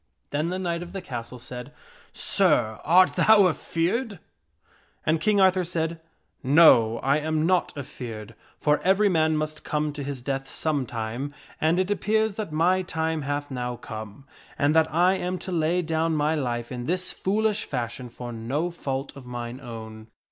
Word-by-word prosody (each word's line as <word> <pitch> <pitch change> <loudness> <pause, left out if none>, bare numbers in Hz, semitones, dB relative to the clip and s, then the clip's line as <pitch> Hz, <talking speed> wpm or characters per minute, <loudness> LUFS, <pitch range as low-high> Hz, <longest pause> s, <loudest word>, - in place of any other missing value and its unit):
Then 150 +3 0
the 185 - -2
knight 170 -2 -2
of 175 +1 -8
the 195 - -4
castle 120 0 -6
said, 125 +2 -8 0.3
" - - -27
Sir, 110 0 +2
art 180 +4 +5
thou 215 -3 +6
afeared? 185 +7 -1 0.4
" - - -35
And 155 +1 +2
King 205 +4 +3
Arthur 185 -1 +4
said, 165 -1 -2 0.3
" - - -45 0.2
No, 115 -8 +7
I 140 +2 +3
am 155 0 0
not 180 0 +2
afeared, 115 -6 -7 0.2
for 150 0 +2
every 195 +3 +3
man 160 -3 +2
must 155 0 -3
come 150 -1 -1
to 145 - -6
his 135 -3 -5
death 135 0 -3
some 145 -5 -1
time, 120 +6 -4 0.3
and 160 +3 +3
it 185 +2 0
appears 220 +1 +1
that 205 -4 -5
my 175 +4 +3
time 160 -3 -2
hath 145 0 -3
now 125 -1 -3
come, 110 +1 -9 0.3
and 145 +2 +2
that 160 0 +4
I 180 +4 +3
am 180 0 -2
to 185 - -7
lay 170 +1 +1
down 160 0 0
my 150 +1 +1
life 120 -5 -2
in 125 -1 -5
this 185 +2 +1
foolish 215 +2 0
fashion 125 -1 -4
for 120 0 -7
no 135 +10 -2
fault 135 -4 -4
of 135 -3 -11
mine 120 +1 -6
own." 110 -3 -9
155 Hz, 180 wpm, -25 LUFS, 125-175 Hz, 0.4 s, No